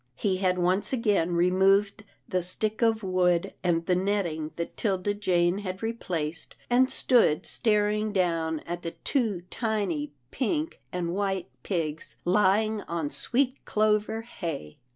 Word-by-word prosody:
He 190 +4 0
had 185 -1 +1
once 180 +3 +1
again 205 -9 +1
removed 195 +4 +3 0.2
the 185 -1 0
stick 215 +5 -2
of 225 -2 +2
wood, 180 -2 +1
and 170 -2 +1
the 180 - +2
netting 180 -5 -1
that 170 - -5
'Tilda 200 -1 0
Jane 180 -2 +1
had 190 0 -5
replaced, 170 -8 -3 0.2
and 255 +2 +5
stood 235 - +3
staring 210 -1 +1
down 165 -5 0
at 175 +1 -5
the 165 - -6
two 220 - 0
tiny 200 -11 -1 0.2
pink 305 +5 -2
and 175 -1 -2
white 195 -3 -1
pigs 160 -4 -3
lying 210 +3 +3
on 165 -4 -2
sweet 260 +1 0
clover 215 +1 +1
hay. 165 - -6
190 Hz, 135 wpm, -27 LUFS, 175-215 Hz, 0.2 s, and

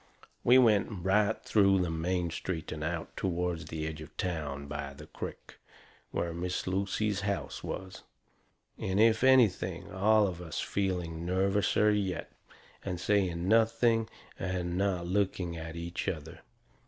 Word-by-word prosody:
We 125 +2 +7
went 110 -6 +5 0.2
right 105 +3 +3
through 100 -2 +4
the 85 - -2
main 85 +1 -1
street 85 -1 -4
and 75 -1 -4
out 80 +1 -3
toward 90 -2 -2
the 80 -1 -4
edge 80 0 -5
of 80 - -12
town, 75 -6 -3
by 70 -1 -5
the - - -11
crick, - - -8 0.5
where 85 -1 -2
Miss 90 +1 -3
Lucy's 100 +2 0
house 100 -1 -3
was. 95 0 -6 0.8
And, 95 +1 -1
if 110 +1 +5
anything, 95 -8 +3
all 105 +2 +4
of 90 -3 -4
us 80 -3 -5
feeling 90 -4 -2
nervouser 95 +3 +2
yet. 95 -4 -1 0.5
And 90 -3 -3
saying 90 -3 +1
nothing 115 +1 +3 0.3
and 90 -2 -2
not 95 -2 0
looking 90 -2 0
at 80 0 -6
each 85 +1 -4
other. 80 0 -4
90 Hz, 140 wpm, -31 LUFS, 85-100 Hz, 0.8 s, We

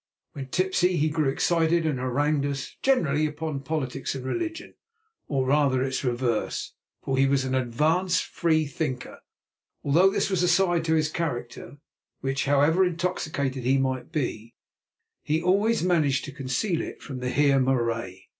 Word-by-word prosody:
When 135 -2 -6
tipsy, 185 +3 +1
he 155 +2 +2
grew 150 -2 +1
excited 165 +3 +1
and 150 -5 0
harangued 140 +3 0
us, 140 -1 -5
generally 155 - +2
upon 150 -1 -4
politics 140 -3 -3
and 130 -1 -6
religion, 330 - -4 0.5
or 135 -3 0
rather 135 -2 +2
its 135 +1 -2
reverse, 120 -3 -1 0.3
for 135 -1 -1
he 135 +1 +4
was 135 -1 +1
an 130 - -2
advanced 150 +9 +1
freethinker, 155 -4 -1 0.6
although 170 +7 +4
this 195 - -1
was 185 -2 +1
a 180 - +3
side 175 -2 +2
to 160 0 +2
his 155 -1 +2
character 145 -4 -5 0.4
which, 135 +1 -1
however 145 +6 +4
intoxicated 155 -7 -2
he 130 +3 +3
might 130 +1 -2
be, 120 -7 -3 0.7
he 155 +2 0
always 200 +5 +2
managed 155 -7 +2
to 145 - -7
conceal 140 +7 -2
from 130 -3 -7
the 125 0 -2
Heer 140 0 +3
Marais. 115 -7 -1
145 Hz, 150 wpm, -26 LUFS, 130-165 Hz, 0.7 s, he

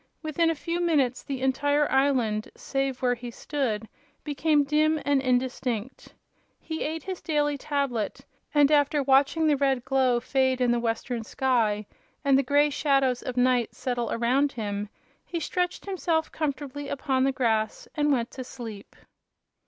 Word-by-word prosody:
Within 320 +2 +1
a 330 - 0
few 335 +3 -3
minutes 285 -8 +1
the 270 -2 -5
entire 285 +2 +2
island, 255 -6 +1
save 270 -2 -3
where 250 -1 +3
he 245 0 -7
stood, 235 -4 -3 0.4
became 295 0 +2
dim 305 +2 +2
and 285 -1 +3
indistinct. 250 -2 -2 0.4
He 320 -1 -5
ate 315 0 -3
his 375 -2 -5
daily 295 -2 0
tablet, 275 -6 -2 0.3
and 290 -1 +4
after 290 0 +3
watching 275 +4 +3
the 300 -2 +4
red 270 -3 +1
glow 260 -2 +2
fade 260 +1 +1
in 250 -1 +3
the 240 - +2
western 235 0 -2
sky 225 -4 0 0.4
and 275 -1 +5
the 270 - +5
gray 290 +2 +3
shadows 270 -3 +2
of 255 -1 -5
night 250 -1 +2
settle 245 -2 -2
around 260 +5 +1
him 205 -3 -4 0.3
he 340 - -4
stretched 360 +3 -2
himself 340 -5 -1
comfortably 285 -2 -4
upon 265 -1 0
the 270 - +3
grass 220 -5 0
and 295 -1 +1
went 240 -3 0
to 260 - -6
sleep. 225 -5 -9
270 Hz, 155 wpm, -26 LUFS, 245-295 Hz, 0.4 s, and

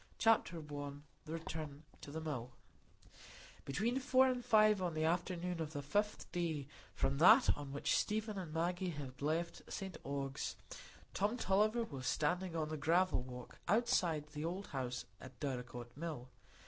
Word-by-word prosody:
Chapter 225 -6 +3
I. 145 -2 -5 0.3
The 155 - -5
Return 155 -3 -5 0.2
to - - -8
the 155 +3 -4
Mill 135 -6 -4 1.1
Between 225 - 0
four 260 -1 +5
and 250 -1 0
five 215 -3 +6
o'clock 185 - +1
on 170 - -4
the 155 - 0
afternoon 175 +1 0
of 155 0 -4
the 145 -2 -3
fifth 205 +9 0
day 165 -5 -1 0.3
from 140 +1 0
that 220 - +8
on 145 -2 -7
which 140 - +1
Stephen 215 0 0
and 175 -4 -6
Maggie 175 +3 0
had 140 -5 -6
left 165 +4 -1
St 190 -1 -4
Ogg's, 140 -1 -3 0.6
Tom 210 +5 +1
Tulliver 215 +3 +3
was 135 - -5
standing 175 +3 0
on 155 -2 -1
the 155 - -3
gravel 170 +1 +3
walk 125 -1 -9
outside 175 -7 +2
the 150 0 -4
old 180 +5 -2
house 125 -3 -3
at 130 -1 -12
Dorlcote 125 -3 -4
Mill. 150 -5 -5
160 Hz, 160 wpm, -37 LUFS, 145-190 Hz, 1.1 s, that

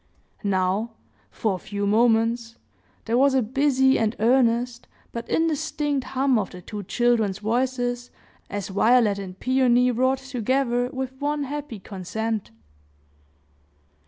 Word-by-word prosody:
Now, 200 +3 0 0.4
for 215 -3 -1
a - - -3
few 200 +2 -4
moments, 230 +2 +2 0.5
there 235 +2 +1
was 275 0 +4
a 260 - +3
busy 265 +2 +2
and 220 0 0
earnest, 240 +1 +2 0.2
but 235 0 -6
indistinct 295 -3 0
hum 260 -2 +3
of 200 - -3
the 180 - -10
two 210 +2 -6
children's 220 -1 +1
voices, 245 +2 -1 0.4
as 205 -2 -4
Violet 210 +1 +3
and 190 -1 -8
Peony 250 -1 +3
wrought 260 +3 +2
together 255 -1 -1
with 260 0 -4
one 295 0 0
happy 285 -4 -5
consent. 210 +3 -4
240 Hz, 125 wpm, -24 LUFS, 215-260 Hz, 0.5 s, was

